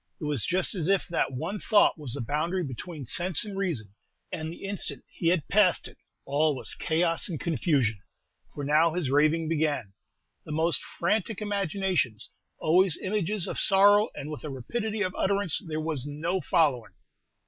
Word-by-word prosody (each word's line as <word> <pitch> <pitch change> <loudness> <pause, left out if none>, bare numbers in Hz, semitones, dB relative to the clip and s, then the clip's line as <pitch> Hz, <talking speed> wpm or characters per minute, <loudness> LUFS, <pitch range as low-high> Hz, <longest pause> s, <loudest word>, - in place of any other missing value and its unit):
It - - -9
was 145 -7 0
just 185 0 +1
as 175 -5 -2
if 195 -1 +2
that 170 - 0
one 160 +11 -4
thought 210 - +4
was 145 -7 -6
the 140 - -1
boundary 160 +9 -1
between 145 +2 -7
sense 180 - +2
and 205 -2 -7
reason, 155 - -2 0.4
and 160 -3 -4
the 170 - -11
instant 200 0 -2
he 170 - -4
had 170 -3 +2
passed 195 -3 +3
it, - - -15 0.3
all 150 +1 +1
was 130 - 0
chaos 165 +3 +1
and 160 -5 -4
confusion; 135 - 0 0.5
for 145 - -6
now 155 +3 +3
his 160 -8 -1
raving 155 +3 +3
began, 150 -10 -1 0.5
the - - -9
most 160 -1 +2 0.2
frantic 210 +4 0
imaginations; 190 - -1 0.3
always 180 +1 +3
images 200 -1 -1
of - - -3
sorrow, 205 +2 +5
and 150 - -6
with 150 - -7
a 150 - -5
rapidity 210 - -3
of 185 -1 -2
utterance 200 -3 +1
there 155 -1 -3
was 155 -4 -3
no 160 +6 -2
following. 140 -6 +1
165 Hz, 170 wpm, -27 LUFS, 145-190 Hz, 0.5 s, sorrow